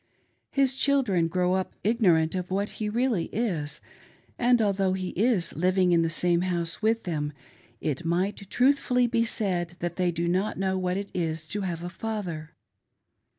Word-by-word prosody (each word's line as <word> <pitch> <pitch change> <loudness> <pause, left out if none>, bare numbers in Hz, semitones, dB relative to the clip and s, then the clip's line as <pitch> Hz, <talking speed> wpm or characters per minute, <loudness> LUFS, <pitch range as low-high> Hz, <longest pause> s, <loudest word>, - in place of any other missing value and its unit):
His 270 -1 +2
children 250 - +2
grow 180 +2 +1
up 190 0 -2
ignorant 180 -8 +3
of 185 -1 -3
what 200 +2 -1
he 210 - 0
really 230 -5 +1
is, 160 -10 -2 0.6
and, 245 0 +4
although 195 -3 +1
he 185 -1 -3
is 200 -4 +1
living 185 +2 +2
in 170 -1 +4
the 165 - +1
same 170 +1 +2
house 175 -1 -2
with 225 +1 +1
them, 150 -4 -2 0.5
it 150 +2 -2
might 180 +4 0
truthfiilly 250 -2 +2
be 230 -1 +3
said 180 -6 0
that 175 -1 -4
they 180 -1 +2
do 170 +1 -2
not 185 +4 0
know 190 0 0
what 185 0 -1
it 200 0 -5
is 160 -2 -2
to 205 - -2
have 175 -3 -3
a 175 - -4
father. 180 -6 -5
185 Hz, 170 wpm, -27 LUFS, 170-215 Hz, 0.6 s, and